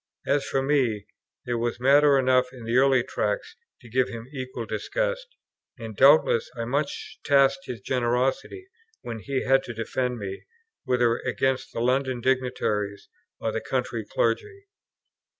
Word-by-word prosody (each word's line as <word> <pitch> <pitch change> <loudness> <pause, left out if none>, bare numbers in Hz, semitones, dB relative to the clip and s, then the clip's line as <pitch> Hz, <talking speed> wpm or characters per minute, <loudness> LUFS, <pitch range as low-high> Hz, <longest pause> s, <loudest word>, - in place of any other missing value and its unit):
As 140 0 +1
for 135 0 -1
me, 125 -8 +1 0.4
there 120 -1 -1
was 120 0 -2
matter 140 +2 +5
enough 130 -1 +2
in 125 -3 -11
the 115 +2 +1
early 130 -2 +4
Tracts 450 - -3 0.3
to 120 - -14
give 125 +3 +1
him 115 -1 -7
equal 130 -3 -5
disgust; - - -2 0.5
and 115 -2 -8
doubtless 140 -2 +5
I 115 - -2
much 140 +4 -3
tasked 135 -1 +3
his 120 -5 -6
generosity, 130 - -1 0.4
when 115 -2 -5
he 135 +4 -2
had 135 +1 +4
to 120 - -7
defend 125 +2 -2
me, 100 -2 -7 0.4
whether 120 -2 +2
against 130 0 -1
the - - -4
London 130 +1 +1
dignitaries 120 -6 -1 0.3
or - - -1
the - - -3
country - - -2
clergy. 425 -5 -2
130 Hz, 150 wpm, -25 LUFS, 120-140 Hz, 0.5 s, matter